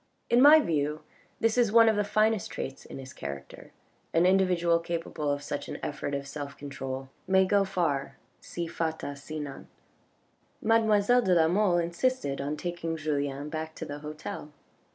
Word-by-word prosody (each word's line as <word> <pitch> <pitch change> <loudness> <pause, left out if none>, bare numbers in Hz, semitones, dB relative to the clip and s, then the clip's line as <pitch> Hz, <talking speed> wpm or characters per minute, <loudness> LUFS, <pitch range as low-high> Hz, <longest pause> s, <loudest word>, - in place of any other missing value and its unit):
In 240 +1 +6
my 300 +3 +9
view 150 - -1 0.4
this 225 +2 +2
is 235 -4 +3
one 230 0 +7
of 220 - +4
the 210 - +2
finest 215 0 +1
traits 135 0 -6
in - - -9
his 130 -1 -9
character, 70 0 -8 0.4
an 165 +2 +5
individual 180 -3 +3
capable 165 -3 -3
of 145 0 -2
such 145 0 -4
an - - -5
effort 145 -1 -3
of 140 0 -4
self 140 -1 -7
control 135 -2 -6 0.2
may 190 0 +4
go 200 +1 +3
far 170 -8 -1 0.2
si 175 - -5
fata 160 -3 -3
sinant. 145 0 -7 0.9
Mademoiselle 225 +1 +4
de 185 -6 +3
la 160 -1 +5
Mole 185 0 +3
insisted 170 - -1
on 145 +2 -3
taking 170 -1 -3
Julien 145 -2 -2
back 160 0 -5
to - - -6
the 145 0 -6
hotel. 150 0 -7
165 Hz, 165 wpm, -28 LUFS, 145-195 Hz, 0.9 s, my